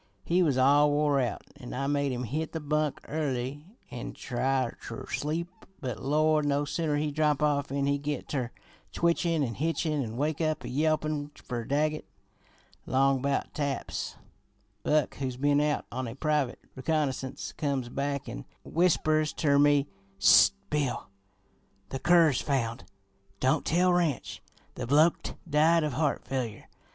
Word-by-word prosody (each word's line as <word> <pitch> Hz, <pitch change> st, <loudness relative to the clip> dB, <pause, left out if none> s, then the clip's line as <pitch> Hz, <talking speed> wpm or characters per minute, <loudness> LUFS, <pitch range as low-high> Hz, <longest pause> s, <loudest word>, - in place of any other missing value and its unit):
He 175 Hz, +2 st, +3 dB
was 145 Hz, -7 st, +2 dB
all 145 Hz, +3 st, +5 dB
wore 145 Hz, -1 st, +2 dB
out, 120 Hz, -, -2 dB
an' 125 Hz, -, -8 dB
I 135 Hz, +2 st, -2 dB
made 140 Hz, -1 st, +1 dB
him 125 Hz, 0 st, -3 dB
hit 155 Hz, +7 st, -3 dB
the 160 Hz, -, -2 dB
bunk 150 Hz, -1 st, -1 dB
early 140 Hz, -2 st, -2 dB, 0.3 s
an' 120 Hz, -, -6 dB
try 130 Hz, 0 st, -1 dB
ter -, -, -7 dB
sleep; 160 Hz, +4 st, -2 dB, 0.3 s
but, 125 Hz, -3 st, -5 dB
Lord! 155 Hz, +2 st, +2 dB
No 145 Hz, 0 st, +1 dB
sooner 155 Hz, 0 st, -1 dB
he'd 150 Hz, 0 st, -1 dB
drop 150 Hz, -1 st, +1 dB
off 145 Hz, -2 st, +1 dB
'n 140 Hz, 0 st, 0 dB
he 140 Hz, 0 st, +1 dB
git 145 Hz, +1 st, -4 dB
ter 130 Hz, -5 st, -2 dB, 0.4 s
twitchin' 170 Hz, -2 st, +1 dB
an' 120 Hz, -4 st, -2 dB
hitchin' 155 Hz, -, -1 dB
an' 115 Hz, -2 st, -5 dB
wake 155 Hz, +3 st, -1 dB
up 155 Hz, -1 st, 0 dB
a -, -, -5 dB
yelpin' 155 Hz, +1 st, 0 dB
fer 120 Hz, -2 st, -5 dB
Daggett. 150 Hz, +3 st, 0 dB, 0.8 s
Long 135 Hz, 0 st, +3 dB
about 140 Hz, +1 st, -1 dB
taps, 140 Hz, -2 st, -3 dB, 0.7 s
Buck, 150 Hz, +2 st, +1 dB
who's 130 Hz, -3 st, -3 dB
been 145 Hz, +2 st, +3 dB
out 150 Hz, 0 st, 0 dB
on 130 Hz, +1 st, -3 dB
a 115 Hz, -, -7 dB
private 150 Hz, -3 st, 0 dB, 0.2 s
reconnoissance, 135 Hz, -2 st, -2 dB
comes 140 Hz, -4 st, -2 dB
back 140 Hz, +2 st, -3 dB
an' -, -, -7 dB, 0.2 s
whispers 155 Hz, -3 st, +2 dB
ter 140 Hz, -2 st, +2 dB
me: 145 Hz, -1 st, +4 dB, 0.3 s
'Ssst, -, -, +7 dB, 0.2 s
Bill! 140 Hz, -8 st, -1 dB, 0.8 s
The 135 Hz, -, -4 dB
cur's 165 Hz, -4 st, +4 dB
found! 125 Hz, -4 st, -1 dB, 0.5 s
Don't 130 Hz, +1 st, +1 dB
tell 180 Hz, +3 st, +3 dB
Ranch; 170 Hz, -7 st, -1 dB, 0.3 s
the 125 Hz, -, -5 dB
bloke'd 155 Hz, +5 st, +3 dB
die 155 Hz, +2 st, +4 dB
of 150 Hz, -3 st, -1 dB
heart 150 Hz, -1 st, 0 dB
failure. 125 Hz, -5 st, -4 dB
145 Hz, 155 wpm, -28 LUFS, 135-155 Hz, 0.8 s, Ssst